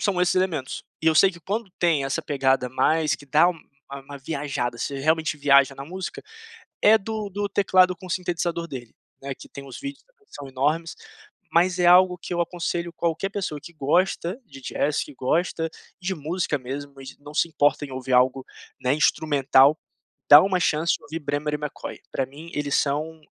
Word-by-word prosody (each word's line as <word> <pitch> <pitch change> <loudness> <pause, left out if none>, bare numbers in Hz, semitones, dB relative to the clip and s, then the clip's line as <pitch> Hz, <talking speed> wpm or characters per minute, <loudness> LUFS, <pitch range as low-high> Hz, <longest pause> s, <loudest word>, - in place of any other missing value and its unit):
são 195 -4 0
esses 180 - +2
elementos, 180 -8 -1 0.2
e - - -2
eu 160 - +5
sei 190 +5 +6
de 170 -2 -14
quando 205 +4 -3
tem 165 -5 +2
essa 135 - -2
pegada 135 -3 +1
mais, 155 +5 +2
que 145 - -13
dá 155 +5 +5
uma 170 -3 -4 0.5
uma 140 0 -9
viajada, 140 -4 -3
você 140 +2 -3
realmente 160 +2 +1
viaja 140 -1 +4
na 135 - -8
música. 185 +4 -6 0.6
É 215 +2 +7
do 215 0 -5
do 205 +1 -2
teclado 185 -2 +3
com 185 +1 -12
sintetizador 170 -1 -2
dele, 130 -6 -8 0.3
né, 135 0 -4
que - - -13
tem 140 - -10
os 135 - -9
vídeos 280 0 -7
que 475 -4 -32
são 145 -1 -8
enormes, 150 +6 -1 0.6
mas 180 +2 +2
é 175 - +3
algo 180 0 +6
que 175 - -6
eu 175 - +1
aconselho 170 0 -3
qualquer 170 +3 -1
pessoa 190 -7 -4
que 170 - -11
gosta 170 - 0
de 135 - -13
jazz, 145 +3 -1
que 145 - -12
gosta 165 +5 0 0.3
de 190 +1 -2
música 155 0 -2
mesmo 140 +2 -7
e - - -11
de 135 - -11
não 145 +1 -11
se 160 - +2
importa 145 -2 +1
em 140 - -12
ouvir 130 0 -3
algo, 130 +1 +3 0.4
né, 130 +1 +2
instrumental. 145 -1 +4 0.5
Dá 145 +1 +11
uma 190 0 +1
chance 160 -1 +1
de - - -27
ouvir 160 +2 -6
Bremer 145 0 -2
e - - -2
McCoy. 150 -1 -6
Pra 135 - -1
mim 150 +6 -12
eles 145 -1 -1
são 155 +3 -1
155 Hz, 195 wpm, -24 LUFS, 140-180 Hz, 0.6 s, Dá